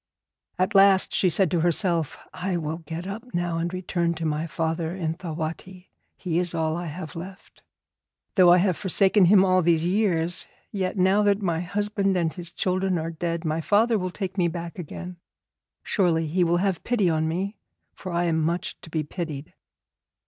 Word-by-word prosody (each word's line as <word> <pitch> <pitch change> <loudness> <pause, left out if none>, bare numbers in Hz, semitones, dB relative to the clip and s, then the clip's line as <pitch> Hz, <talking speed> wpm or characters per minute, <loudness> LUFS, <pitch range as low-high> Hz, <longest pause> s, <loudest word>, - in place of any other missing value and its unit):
At 185 +2 0
last 195 -1 +5
she 185 - +3
said 175 0 +2
to 175 - +2
herself, 170 -2 +1 0.2
'I 185 0 -2
will 160 -1 -3
get 165 +2 -7
up 220 +5 -7
now 175 -1 -1
and 170 +1 -2
return 175 -2 -1
to 165 0 -4
my 155 +1 -1
father 165 +1 -2
in 165 -4 -2
Thawatti; 170 +2 -6 0.3
he 175 -2 -1
is 180 -1 0
all 160 -1 0
I 175 0 -4
have 160 +2 -7
left. 185 +3 -10 0.7
Though 180 -3 +6
I 175 - +7
have 180 -1 +2
forsaken 195 +1 +3
him 190 +1 +6
all 185 -1 +3
these 165 -1 +2
years, 175 -3 +1 0.2
yet 190 0 -2
now 190 +3 +4
that 205 0 +2
my 170 -3 0
husband 200 +1 0
and 165 -2 0
his 175 -2 -7
children 185 0 0
are 165 +1 -3
dead, 170 +1 -3
my 160 +1 -1
father 215 +5 +3
will 185 0 -2
take 190 +1 -5
me 175 - +3
back 170 +1 -6
again. 180 +2 -7 0.7
Surely 170 -5 +1
he 175 +4 +1
will 170 0 +2
have 190 -1 -1
pity 230 -6 +1
on 160 -1 +1
me, 190 +6 -3 0.4
for 185 - -7
I 170 0 0
am 165 -2 +1
much 170 +3 -2
to - - -12
be 155 -1 -1
pitied.' 150 -2 -6
175 Hz, 185 wpm, -25 LUFS, 165-190 Hz, 0.7 s, I